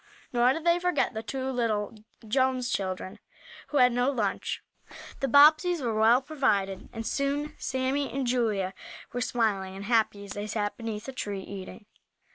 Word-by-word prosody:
Nor 245 Hz, +1 st, +4 dB
did 320 Hz, -, -5 dB
they 340 Hz, 0 st, +3 dB
forget 360 Hz, -6 st, +1 dB
the 220 Hz, -, -4 dB
two 260 Hz, +4 st, -3 dB
little 225 Hz, -5 st, -1 dB, 0.3 s
Jones 260 Hz, +1 st, +1 dB
children, 185 Hz, -1 st, -3 dB, 0.5 s
who 295 Hz, -, -1 dB
had 250 Hz, -2 st, +6 dB
no 245 Hz, +2 st, +2 dB
lunch. 225 Hz, -8 st, -2 dB, 0.6 s
The 275 Hz, -, 0 dB
Bobbseys 310 Hz, +6 st, +6 dB
were 240 Hz, -5 st, -1 dB
well 225 Hz, +4 st, +4 dB
provided 205 Hz, -10 st, 0 dB
and 225 Hz, 0 st, -6 dB
soon 290 Hz, +3 st, -1 dB
Sammie 265 Hz, +2 st, -1 dB
and 270 Hz, -1 st, -2 dB
Julia 220 Hz, -6 st, 0 dB, 0.4 s
were 245 Hz, -, -2 dB
smiling 205 Hz, -6 st, 0 dB
and 195 Hz, +1 st, -7 dB
happy 215 Hz, -3 st, +1 dB
as 200 Hz, -, -10 dB
they 205 Hz, +1 st, -4 dB
sat 205 Hz, -1 st, -2 dB
beneath 225 Hz, -1 st, -5 dB
a -, -, -4 dB
tree, 205 Hz, -6 st, -4 dB
eating. 200 Hz, +2 st, -9 dB
240 Hz, 165 wpm, -28 LUFS, 205-270 Hz, 0.6 s, had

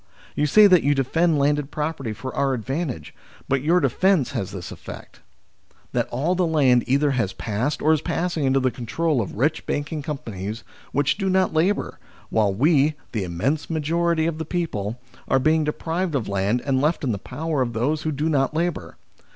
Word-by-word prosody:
You 150 Hz, -, +1 dB
say 210 Hz, +8 st, +7 dB
that 185 Hz, -5 st, +6 dB
you 145 Hz, +1 st, +2 dB
defend 160 Hz, +5 st, +2 dB
landed 145 Hz, 0 st, +1 dB
property 150 Hz, -6 st, -3 dB
for 130 Hz, +4 st, -6 dB
our 135 Hz, -1 st, +1 dB
advantage; 135 Hz, +4 st, -4 dB, 0.3 s
but 135 Hz, -1 st, +1 dB
your 165 Hz, +5 st, +3 dB
defence 150 Hz, +1 st, +2 dB
has 115 Hz, -9 st, -3 dB
this 90 Hz, -3 st, -7 dB
effect: -, -, -10 dB, 0.7 s
that -, -, 0 dB
all 145 Hz, +9 st, 0 dB
the 180 Hz, -1 st, +1 dB
land 135 Hz, -6 st, +4 dB
either 140 Hz, +2 st, +2 dB
has 115 Hz, -7 st, -1 dB
passed 115 Hz, +7 st, -2 dB
or 155 Hz, +1 st, +5 dB
is 155 Hz, -, +1 dB
passing 170 Hz, -4 st, -1 dB
into 135 Hz, 0 st, +3 dB
the 130 Hz, -1 st, +1 dB
control 140 Hz, +4 st, -1 dB
of 100 Hz, -, -5 dB
rich 145 Hz, +8 st, 0 dB
banking 145 Hz, +1 st, -2 dB
companies 115 Hz, -7 st, -5 dB, 0.3 s
which 145 Hz, +7 st, +1 dB
do 195 Hz, -1 st, 0 dB
not 185 Hz, -2 st, +2 dB
labour; 180 Hz, +6 st, 0 dB, 0.3 s
while 105 Hz, -3 st, +2 dB
we, 145 Hz, -, +3 dB, 0.2 s
the 110 Hz, -4 st, -2 dB
immense 100 Hz, -, -2 dB
majority 165 Hz, +1 st, +1 dB
of 165 Hz, -1 st, -2 dB
the -, -, -1 dB
people, 125 Hz, -, -3 dB, 0.3 s
are 135 Hz, -, +3 dB
being 155 Hz, +4 st, +3 dB
deprived 165 Hz, +2 st, -2 dB
of 125 Hz, -6 st, -1 dB
land 100 Hz, +5 st, 0 dB
and 135 Hz, -2 st, +1 dB
left 150 Hz, +3 st, +1 dB
in 130 Hz, -, +1 dB
the 100 Hz, -, -3 dB
power 150 Hz, +6 st, -3 dB
of 120 Hz, -2 st, -1 dB
those 140 Hz, +7 st, 0 dB
who 155 Hz, -, -2 dB
do 150 Hz, +2 st, -1 dB
not 145 Hz, -2 st, +1 dB
labour. 165 Hz, -, -2 dB
145 Hz, 190 wpm, -23 LUFS, 125-160 Hz, 0.7 s, say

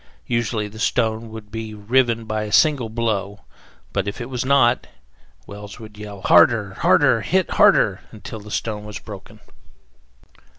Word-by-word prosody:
Usually 115 Hz, -3 st, -1 dB
the 110 Hz, +1 st, -12 dB
stone 115 Hz, -1 st, 0 dB
would 110 Hz, -2 st, -10 dB
be 110 Hz, -1 st, -6 dB
riven 115 Hz, +2 st, +1 dB
by 110 Hz, -1 st, -2 dB
a 105 Hz, -, -7 dB
single 135 Hz, -2 st, +3 dB
blow; 105 Hz, -3 st, -2 dB, 0.5 s
but 100 Hz, -1 st, -1 dB
if 100 Hz, -, -4 dB
it 120 Hz, +2 st, -7 dB
was 125 Hz, -1 st, -2 dB
not, 130 Hz, -2 st, +3 dB, 0.6 s
Wells 105 Hz, -1 st, -10 dB
would 110 Hz, -1 st, -11 dB
yell, 105 Hz, -2 st, -9 dB
"Harder! 100 Hz, +3 st, +4 dB
harder! 130 Hz, -6 st, +4 dB
hit 185 Hz, +6 st, 0 dB
harder!" -, -, +4 dB
until 110 Hz, -, -9 dB
the 105 Hz, +1 st, -12 dB
stone 105 Hz, 0 st, -3 dB
was 105 Hz, 0 st, -7 dB
broken. 105 Hz, +1 st, -11 dB
110 Hz, 155 wpm, -21 LUFS, 105-120 Hz, 0.6 s, Harder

